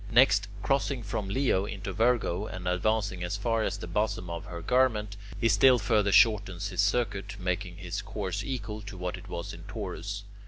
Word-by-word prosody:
Next, 110 -4 +5 0.2
crossing 135 -2 0
from 100 -1 -3
Leo 100 -4 +2
into 95 -2 -5
Virgo, 110 -3 +1
and 90 -1 -6
advancing 95 0 0
as 90 +3 -2
far 115 +2 0
as 100 - -1
the 100 - -6
bosom 90 -1 -1
of 85 +3 -5
her 85 -4 -7
garment, 110 -5 +2 0.2
he 115 - +3
still 130 +2 +6
further 105 -2 +2
shortens 100 -3 +4
his 95 0 +1
circuit, 100 -2 0
making 90 0 -2
his 90 +1 -4
course 100 -1 -3
equal 110 -5 -4
to 100 -2 -9
what 90 0 -3
it - - -12
was 85 -1 -5
in 85 - -10
Taurus. 100 0 -5
100 Hz, 185 wpm, -29 LUFS, 95-110 Hz, 0.2 s, still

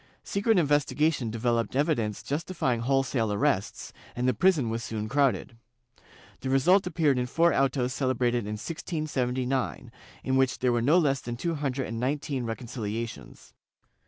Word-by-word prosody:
Secret 205 +2 +1
inves 145 -3 +3
tigation 150 -5 0
developed 115 0 -1
evidence 130 -8 0
justifjdng 145 -5 -1
wholesale 125 -3 +1
arrests, 100 0 -1 0.2
and 125 +1 -1
the 130 - +3
prison 145 - +2
was 115 +1 -3
soon 110 -2 -4
crowded. 135 -2 +1 0.8
The 130 - -4
result 180 +9 +4
appeared 155 -6 +2
in 125 - -1
four 170 +6 +3
autos 130 -2 +1
celebrated 125 -4 0
in 105 - -3
1679, 130 -4 -2 0.3
in 130 - 0
which 130 -1 +2
there 125 -1 +1
were 120 -1 +1
no 145 +9 +4
less 140 -6 +2
than 120 0 -5
two 170 +6 -1
hundred 140 -4 -2
and 115 +1 -5
nineteen 135 0 -2
reconcihations. 115 - -6
130 Hz, 150 wpm, -27 LUFS, 115-145 Hz, 0.8 s, result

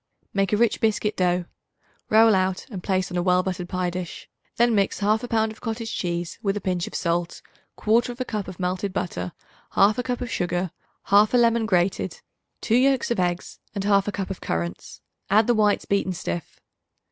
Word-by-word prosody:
Make 195 -1 +1
a 210 - +3
rich 235 -1 +2
biscuit 215 -1 +1
dough; 180 -1 +1 0.6
roll 220 +1 +6
out 185 -1 0
and 190 -4 -5
place 185 0 -1
on 180 - -2
a - - +2
well 180 0 +3
buttered 180 -1 -4
pie 180 -1 -1
dish. 180 -1 -6 0.3
Then 240 0 +3
mix 200 -2 +1
1/2 215 +4 +1
pound 220 -1 +1
of 220 - -14
cottage 225 -1 -4
cheese 175 -1 -3
with 200 -2 0
a - - -1
pinch 180 -3 -1
of - - -8
salt, 170 0 -1 0.3
1/4 240 +3 +1
cup 210 -4 -3
of 185 -1 -9
melted 185 +2 -2
butter, 90 - -3 0.5
1/2 210 +5 +5
cup 245 -1 -2
of 245 -2 -4
sugar, 175 -1 -1 0.4
1/2 205 +4 +5
lemon 230 -1 +3
grated, 185 -2 0 0.4
2 230 - +2
yolks 265 -1 +2
of 235 - 0
eggs 175 0 -2 0.2
and 200 - -2
1/2 200 0 +3
cup 195 -2 -4
of 190 - -6
currants; 85 +1 -4 0.3
add 210 +3 +5
the 240 - +3
whites 210 -2 +2
beaten 200 -2 0
stiff. 85 - -5
195 Hz, 185 wpm, -24 LUFS, 180-220 Hz, 0.6 s, roll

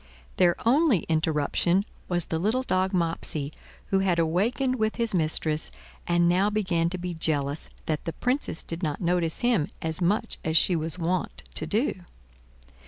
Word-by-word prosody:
Their 175 -2 +4
only 270 - +4
interruption 160 +4 +1 0.2
was 175 -2 +3
the 160 - -2
little 220 +8 +1
dog 185 -5 +1
Mopsey, 165 -5 -1 0.4
who 195 - +4
had 190 -3 +2
awakened 220 +11 +1
with 220 -1 0
his 230 -3 0
mistress, 155 -2 +1 0.4
and 175 0 +3
now 185 +4 +3
began 180 -6 +1
to 185 - -3
be 180 0 -4
jealous 150 -3 0 0.2
that 155 -2 -2
the 165 - -3
Princess 250 - -1
did 165 +1 -5
not 150 -4 -2
notice 175 -2 0
him 240 -11 +2
as 160 +2 -4
much 205 +6 0
as 160 0 +2
she 180 - +4
was 160 +1 -3
wont 175 +1 -2
to 155 - -3
do. 210 - 0
175 Hz, 165 wpm, -26 LUFS, 160-200 Hz, 0.4 s, Their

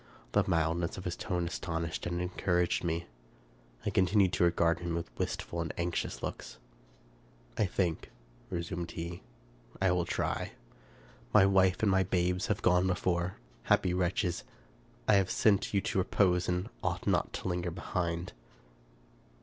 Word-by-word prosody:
The - - +4
mildness 85 +1 +1
of 95 - -6
his 90 - -2
tone 90 -2 -2
aston 85 -1 -3
ished 80 +1 -4
and 85 0 -2
encouraged 90 -1 0
me. 85 0 -1 0.8
I - - +1
continued 95 0 +3
to - - +2
regard 85 -1 +3
him 85 -1 -2
with 80 -8 -5
wistful 85 - -2
and 85 - -3
anxious 85 0 -2
looks. - - -5 0.5
" - - -30
I 105 - +3
think," 85 -3 -1 0.4
resumed 85 -1 -3
he, 85 +1 -5 0.3
" - - -23
I 95 -1 +3
will 90 -1 +1
try. - - -2 0.8
My 100 -2 +8
wife 95 0 +3
and 105 - +4
my 95 0 +4
babes 90 0 +1
have 105 - -1
gone 90 +1 +4
before. 90 0 0 0.3
Happy 90 -2 +3
wretches! 90 -1 0 0.6
I 105 - +6
have 95 -2 +2
sent 100 -3 +3
you 100 - +2
to 95 - -1
repose, 90 -1 +2
and 90 +3 -1
ought - - -2
not - - +1
to - - -4
linger 90 -1 -1
behind." 85 -1 -3
90 Hz, 160 wpm, -31 LUFS, 85-95 Hz, 0.8 s, My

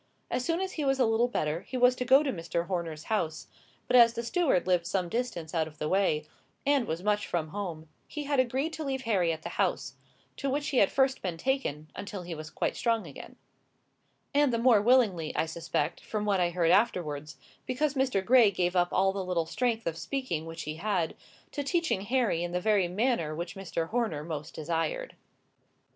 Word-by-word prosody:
As 250 - 0
soon 335 +5 0
as 380 0 -2
he 305 - -3
was 270 -1 +2
a 255 - +5
little 225 +2 +2
better, 155 -8 -1
he 255 - -6
was 250 0 +5
to 250 - -2
go 270 +4 +6
to 275 - -1
Mr. 170 -1 -2
Horner's 170 -4 -3
house; 165 -8 -2 0.4
but, - - +1
as 235 -1 +7
the 235 - -3
steward 270 - +1
lived 180 -2 +2
some 180 -1 -1
distance 205 -8 -3
out 160 -2 +1
of 155 -1 -13
the 150 - -2
way, 185 -4 +1 0.4
and 280 -4 +2
was 165 +3 -3
much 210 0 +1
from 160 -3 -2
home, 165 -4 -5 0.2
he 300 - -5
had 285 -1 0
agreed 265 +6 0
to 315 - -4
leave 265 -2 -2
Harry 190 -8 +2
at 160 -1 -5
the - - -7
house; - - -1 0.4
to 275 - -2
which 290 +2 -1
he 270 - -1
had 200 - +5
first 265 -1 +2
been 175 -3 -3
taken, 165 - -2
until 200 -2 -6
he 175 0 -6
was 155 -1 -7
quite - - -2
strong 230 -4 0
again; 145 - -10 1.0
and 290 -2 +4
the 230 - +1
more 230 -3 +5
willingly, 210 -9 +3
I - - +1
suspect, 160 -2 -2
from 210 -1 -3
what 200 -2 +2
I 175 -1 +2
heard 170 -1 +2
afterwards, 155 -9 +1 0.3
because 280 +3 0
Mr. 260 -8 0
Gray 240 -2 +6
gave 180 -2 -1
up 175 -1 +3
all 190 0 +2
the 195 -1 -3
little 180 -3 0
strength 230 +5 -1
of 165 0 -2
speaking 255 - -3
which 165 0 -6
he 155 +1 -5
had, 185 -3 -1 0.4
to 290 - -3
teaching 325 - 0
Harry 230 -6 +1
in 175 0 -4
the 180 - +1
very 200 -2 +2
manner 180 -5 0
which 170 +2 -5
Mr. 175 -4 -4
Horner 220 -11 -1
most 155 -1 -6
desired. 165 - -2
200 Hz, 210 wpm, -29 LUFS, 165-255 Hz, 1.0 s, as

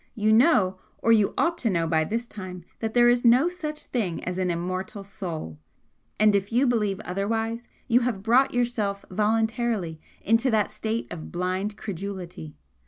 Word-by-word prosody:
You 215 0 +2
know, 215 - +4 0.2
or 230 - +2
you 215 -3 +3
ought 340 0 +1
to 230 - +1
know 170 -4 +1
by 160 -1 +1
this 235 +6 -2
time, 185 -5 -8
that 220 0 -3
there 240 0 +6
is 240 0 +3
no 250 +8 +5
such 305 -4 -5
thing 195 -9 -2
as 180 +1 -3
an 185 -1 0
immortal 185 +4 -3
soul 175 - -6 0.6
and 215 0 +5
if 200 +1 0
you 245 +4 +3
believe 210 -6 +1
otherwise 225 +5 -2 0.2
you 245 0 +4
have 235 -6 -2
brought 245 +5 +4
yourself 225 -5 -1
voluntarily 215 -4 0 0.2
into 230 +4 +3
that 215 -3 +1
state 225 +1 -3
of 160 -3 -7
blind 185 +4 -2
credulity. 180 - -6
210 Hz, 170 wpm, -25 LUFS, 185-235 Hz, 0.6 s, there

